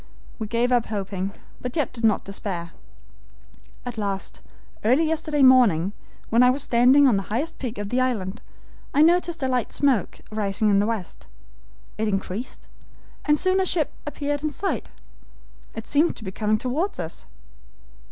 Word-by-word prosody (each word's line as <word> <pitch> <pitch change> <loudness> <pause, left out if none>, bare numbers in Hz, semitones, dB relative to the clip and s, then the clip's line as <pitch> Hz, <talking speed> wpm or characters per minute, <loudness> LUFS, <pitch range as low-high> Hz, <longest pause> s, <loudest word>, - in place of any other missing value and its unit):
We 220 - -3
gave 235 +3 +1
up 245 -2 +2
hoping, 195 -2 -3 0.3
but 250 0 -5
yet 300 -5 0
did 235 -2 -8
not 215 -2 +3
despair. 185 -4 -5 1.1
At 240 -2 -5
last, 200 -2 -3 0.4
early 255 +9 +4
yesterday 310 -2 0
morning, 215 -9 +5 0.4
when 230 +2 +5
I 250 - +7
was 270 +2 +1
standing 250 +4 +5
on 230 -6 +4
the - - 0
highest 265 +10 -2
peak 250 -3 -4
of 205 -1 -4
the 250 +3 +1
island, 220 -5 -1 0.5
I 295 - +6
noticed 345 -1 +2
a - - +2
light 250 -3 0
smoke 265 -9 +1
rising 215 0 0
in 200 -1 +4
the 205 - +2
west. 220 -6 -5 0.7
It 220 - +1
increased, 195 +3 -4 0.6
and 300 0 +4
soon 370 +4 +2
a - - +1
ship 330 -4 +1 0.2
appeared 290 -1 -2
in 305 - 0
sight. 385 +6 -3 0.9
It 225 - -6
seemed 300 +4 +2
to - - -10
be 190 - -5
coming 215 +2 +1
toward 270 - -2
us. 160 - -6
240 Hz, 165 wpm, -24 LUFS, 205-285 Hz, 1.1 s, I